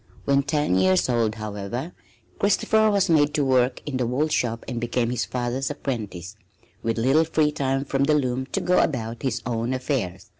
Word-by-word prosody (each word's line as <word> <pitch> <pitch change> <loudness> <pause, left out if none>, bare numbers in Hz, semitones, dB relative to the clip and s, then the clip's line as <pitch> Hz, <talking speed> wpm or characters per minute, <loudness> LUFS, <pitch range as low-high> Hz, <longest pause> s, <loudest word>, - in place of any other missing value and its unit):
When 140 0 +3
ten 145 - +1
years 95 +5 +3
old, 115 -3 +1
however, 110 - -5 0.5
Christopher 215 +2 +3
was 200 -2 +2
made 150 -3 +3
to 145 -3 +2
work 130 -1 +2
in 145 -3 -3
the 125 -2 0
wool 140 +6 0
shop 115 -5 -1
and 120 -2 -4
became 120 0 0
his 125 -1 -1
father's 125 +2 -2
apprentice, 110 - -5 0.5
with 115 0 -1
little 135 +7 +3
free 155 -2 +1
time 135 -2 -1
from 140 0 +1
the 150 +1 +3
loom 130 -2 -1
to - - -2
go 180 0 +3
about 115 -4 -1
his 130 - -2
own 120 +1 -1
affairs. 105 -7 -3
130 Hz, 185 wpm, -24 LUFS, 115-145 Hz, 0.5 s, When